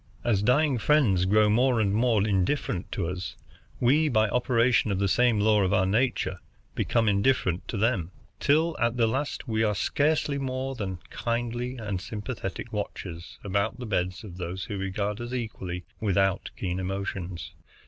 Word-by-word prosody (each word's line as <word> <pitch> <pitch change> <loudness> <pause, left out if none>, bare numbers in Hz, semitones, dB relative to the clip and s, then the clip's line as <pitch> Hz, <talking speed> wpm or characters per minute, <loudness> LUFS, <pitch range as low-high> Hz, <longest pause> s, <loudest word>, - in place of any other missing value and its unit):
As 110 -5 +2
our - - -2
dying 135 0 +3
friends 110 -10 +3
grow 105 +2 +4
more 120 +3 +3
and 100 -2 +2
more 110 -2 +2
indifferent 95 -1 0
to 90 -5 -1
us, 90 +1 -5 0.4
we, 150 +6 +4
by 110 -4 +3
operation 120 -1 +2
of 100 - 0
the 100 +1 +1
same 115 +3 +3
law 105 0 +4
of 95 -2 +1
our 95 - +3
nature, 100 -3 0 0.3
become 115 -2 +1
indifferent 100 -3 +1
to 115 - -3
them, 100 -6 +1 0.3
till 160 +3 +3
at 120 +1 +1
the 115 - +4
last 135 +5 -2
we 110 -1 0
are 105 -2 +2
scarcely 145 +4 +1
more 130 0 -2
than 100 -7 -4
kindly 120 +2 -2
and 105 -5 -3
sympathetic 105 +1 -5
watchers 85 0 -5
about 100 +3 0
the 125 - -6
beds 90 -3 -1
of 90 -5 -9
those 90 +1 -4
who 100 - -5
regard 100 +3 -2
us 120 +1 -5
equally 95 -7 -4 0.2
without 95 -2 +1
keen 90 -1 -2
emotions. 95 -2 -4
110 Hz, 170 wpm, -27 LUFS, 95-125 Hz, 0.4 s, grow